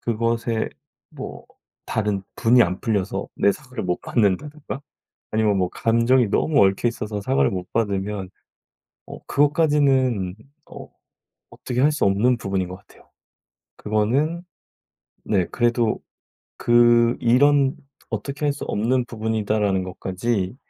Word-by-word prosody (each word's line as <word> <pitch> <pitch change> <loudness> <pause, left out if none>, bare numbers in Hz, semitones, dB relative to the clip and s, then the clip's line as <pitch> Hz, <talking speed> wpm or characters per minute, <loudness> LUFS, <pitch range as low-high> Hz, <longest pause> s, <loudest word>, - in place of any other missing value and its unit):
그것에 115 0 -1 0.4
뭐 - - -8 0.4
다른 105 -3 -1
분이 120 +1 +5
안 90 +2 -4
풀려서 100 -4 -2
내 100 - +3
사과를 125 0 -8
못 90 -1 -1
받는다든가 140 +7 -1 0.5
아니면 110 -2 +2
뭐 90 -1 +1
감정이 115 +1 +2
너무 145 -5 +3
얽혀 95 +5 +1
있어서 105 -3 -4
사과를 130 +4 +1
못 90 -1 -6
받으면 100 -3 -2 0.8
어 - - -10
그것까지는 140 - +2 0.4
어 - - -10 0.6
어떻게 125 0 -4
할 150 - +4
수 150 - 0
없는 115 +6 +2
부분인 95 -3 -2
것 90 - -7
같아요. - - -22 0.7
그거는 130 +11 0 0.8
네 95 -4 +1
그래도 120 -2 +1 0.6
그 120 0 +4
이런 135 +3 +4 0.3
'어떻게 140 +7 -4
할 145 - +3
수 140 - -7
없는 120 +4 0
부분이다.'라는 110 -4 -1
것까지 95 +3 -3
115 Hz, 260 characters per minute, -22 LUFS, 100-130 Hz, 0.8 s, 분이